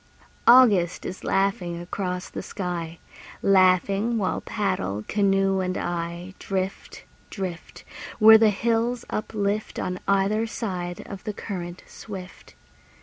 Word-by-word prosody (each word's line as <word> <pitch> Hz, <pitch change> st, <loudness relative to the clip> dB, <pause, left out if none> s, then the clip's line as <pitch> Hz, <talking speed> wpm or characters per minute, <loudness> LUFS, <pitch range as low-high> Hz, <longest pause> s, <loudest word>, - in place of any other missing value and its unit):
August 210 Hz, -9 st, +6 dB
is 185 Hz, -, -6 dB
laughing 190 Hz, -3 st, 0 dB
across 180 Hz, +1 st, -4 dB
the -, -, -6 dB
sky, 170 Hz, -4 st, -5 dB, 0.5 s
Laughing 195 Hz, +4 st, +3 dB
while 190 Hz, -4 st, -1 dB
paddle, 105 Hz, -, -2 dB
canoe 195 Hz, -1 st, +2 dB
and 185 Hz, 0 st, -1 dB
I, 175 Hz, +1 st, -4 dB
Drift, 190 Hz, 0 st, -4 dB, 0.3 s
drift, 185 Hz, -4 st, -6 dB, 0.3 s
Where 220 Hz, 0 st, +9 dB
the 220 Hz, -1 st, +5 dB
hills 230 Hz, +3 st, 0 dB
uplift 210 Hz, -1 st, -2 dB
On 180 Hz, 0 st, -3 dB
either 200 Hz, +3 st, +2 dB
side 180 Hz, -6 st, -4 dB
of 195 Hz, -2 st, -9 dB
the 210 Hz, -, -4 dB
current 180 Hz, -4 st, -6 dB
swift. 190 Hz, -4 st, -10 dB
195 Hz, 115 wpm, -25 LUFS, 180-210 Hz, 0.5 s, Where